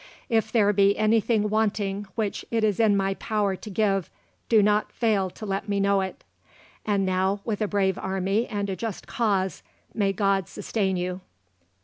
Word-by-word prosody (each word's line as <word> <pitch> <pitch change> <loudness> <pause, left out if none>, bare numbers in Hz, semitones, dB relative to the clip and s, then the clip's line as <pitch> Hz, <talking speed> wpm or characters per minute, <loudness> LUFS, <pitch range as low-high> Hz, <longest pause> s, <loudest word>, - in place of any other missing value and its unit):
If 225 -2 +1
there 210 -3 +3
be 200 0 +4
anything 215 0 +2
wanting 205 -2 -1
which 215 -3 -2
it 225 -1 0
is 210 -1 +1
in 215 -3 +4
my 195 0 +1
power 205 -1 -1
to 210 - -10
give, 195 -3 0 0.4
do 220 -3 +5
not 210 +1 +2
fail 210 -5 +1
to 215 - -9
let 195 +1 -3
me 200 -1 +1
know 200 0 +3
it. 190 0 -6 0.6
And 200 -2 +1
now, 190 +2 +1
with 220 -2 -2
a 215 - +1
brave 195 -2 0
army 195 +4 -1
and 205 -2 -2
a - - -2
just 220 +1 -5
cause, 195 -6 0 0.3
may 200 -2 +1
God 195 -2 +1
sustain 195 -4 -2
you. 180 +1 -3
200 Hz, 175 wpm, -25 LUFS, 195-215 Hz, 0.6 s, do